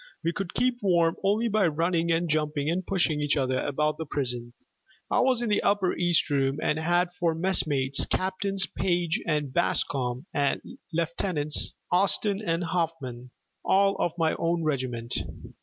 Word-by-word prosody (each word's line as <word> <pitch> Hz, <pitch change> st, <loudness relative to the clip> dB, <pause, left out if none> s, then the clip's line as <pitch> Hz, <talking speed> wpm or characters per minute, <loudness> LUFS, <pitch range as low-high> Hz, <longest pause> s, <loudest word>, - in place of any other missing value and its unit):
We 170 Hz, -, 0 dB
could 190 Hz, -2 st, -5 dB
keep 250 Hz, 0 st, +1 dB
warm 170 Hz, -4 st, +3 dB
only 210 Hz, +4 st, +2 dB
by 210 Hz, -4 st, +2 dB
running 170 Hz, +2 st, 0 dB
and 165 Hz, +1 st, +1 dB
jumping 150 Hz, -1 st, 0 dB
and 185 Hz, +2 st, -1 dB
pushing 170 Hz, -6 st, +1 dB
each 145 Hz, 0 st, +1 dB
other 130 Hz, -1 st, 0 dB
about 150 Hz, +3 st, -1 dB
the 160 Hz, -, -4 dB
prison. 120 Hz, -4 st, -3 dB, 0.6 s
I -, -, +3 dB
was 255 Hz, -2 st, +2 dB
in 235 Hz, -, -1 dB
the 205 Hz, -, +2 dB
upper 200 Hz, -3 st, +2 dB
east 175 Hz, -2 st, +2 dB
room, 135 Hz, -1 st, +1 dB
and 150 Hz, -, 0 dB
had 175 Hz, +2 st, +1 dB
for 165 Hz, -2 st, +1 dB
messmates 145 Hz, -6 st, +1 dB
Captains 190 Hz, 0 st, 0 dB
Page 175 Hz, +2 st, -1 dB
and 150 Hz, -4 st, -1 dB
Bascom 130 Hz, -5 st, 0 dB
and 140 Hz, -2 st, +1 dB, 0.3 s
Lieutenants 160 Hz, -2 st, 0 dB, 0.2 s
Austin 195 Hz, +2 st, +2 dB
and 165 Hz, -2 st, 0 dB
Hoffman, 160 Hz, -8 st, -3 dB, 0.3 s
all 195 Hz, +1 st, +3 dB
of 170 Hz, -, 0 dB
my 160 Hz, -2 st, +2 dB
own 170 Hz, 0 st, 0 dB
regiment. 125 Hz, -5 st, -2 dB
165 Hz, 155 wpm, -27 LUFS, 145-185 Hz, 0.6 s, warm